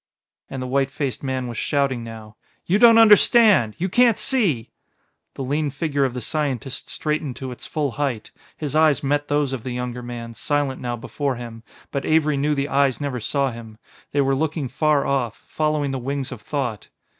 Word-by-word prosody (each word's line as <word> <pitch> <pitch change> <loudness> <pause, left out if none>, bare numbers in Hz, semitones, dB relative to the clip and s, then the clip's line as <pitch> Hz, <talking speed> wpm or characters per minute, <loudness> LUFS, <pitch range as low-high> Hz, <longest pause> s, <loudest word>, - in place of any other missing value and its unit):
and 135 -1 -5
the - - -4
white 135 +1 +1
faced 135 -2 -3
man 130 -2 -2
was 120 -3 -5
shouting 135 -4 0
now 110 -2 -10 0.3
"you 195 +4 +2
don't 230 -1 +8
understand 210 - +6
you 185 - -1
can't 235 +3 +4
see 170 - 0 0.3
" - - -49
The 135 - -4
lean 145 +3 0
figure 145 -1 0
of 130 -2 -3
the 125 - -3
scientist 135 -1 -2
straightened 150 -4 -2
to 130 -1 -6
its 125 - -8
full 145 -3 -1
height. 130 -5 -3 0.3
His 150 -1 -4
eyes 155 -2 +4
met 145 +1 0
those 145 -2 0
of 130 - -4
the 130 - -6
younger 125 0 -4
man, 120 -1 -7
silent 145 +1 -1
now 120 -1 -2
before 130 +3 -3
him, 115 -2 -8 0.3
but 140 - -2
Avery 155 -2 +2
knew 145 +2 +1
the 140 0 -1
eyes 140 -2 +2
never 140 -4 -3
saw 135 +4 0
him; 115 -2 -10 0.3
they 145 - +2
were 135 0 +2
looking 150 0 -1
far 145 +2 +1
off, 125 -5 -1
following 150 -2 0
the 135 - -3
wings 135 +1 -3
of 125 -5 -8
thought. 125 -7 -3
140 Hz, 195 wpm, -22 LUFS, 125-150 Hz, 0.3 s, don't